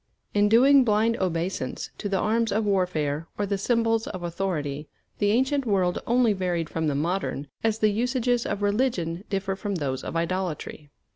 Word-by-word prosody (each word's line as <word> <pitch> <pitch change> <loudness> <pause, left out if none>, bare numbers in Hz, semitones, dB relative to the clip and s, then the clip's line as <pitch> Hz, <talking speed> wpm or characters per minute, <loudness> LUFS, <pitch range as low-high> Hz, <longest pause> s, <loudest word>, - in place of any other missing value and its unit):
In 205 0 +3
doing 265 +5 +6
blind 225 +1 +2
obeisance 180 0 -2
to 205 - -3
the 195 - +1
arms 225 +3 +1
of 215 +2 +1
warfare 165 -6 0
or 205 - 0
the 200 0 -2
symbols 225 0 +1
of 185 - -6
authority, 160 -5 -3 0.3
the 205 - +2
ancient 265 +5 +2
world 190 -6 +1
only 240 -2 +3
varied 180 -4 -2
from 160 -1 -1
the 145 - 0
modern 160 -1 -1 0.2
as 220 -1 +1
the 215 -1 +3
usages 245 +2 0
of 205 - -3
religion 200 -6 0
differ 195 -1 -1
from 200 0 -3
those 135 -6 -2
of - - -5
idolatry. 170 -3 -3
195 Hz, 170 wpm, -26 LUFS, 170-225 Hz, 0.3 s, doing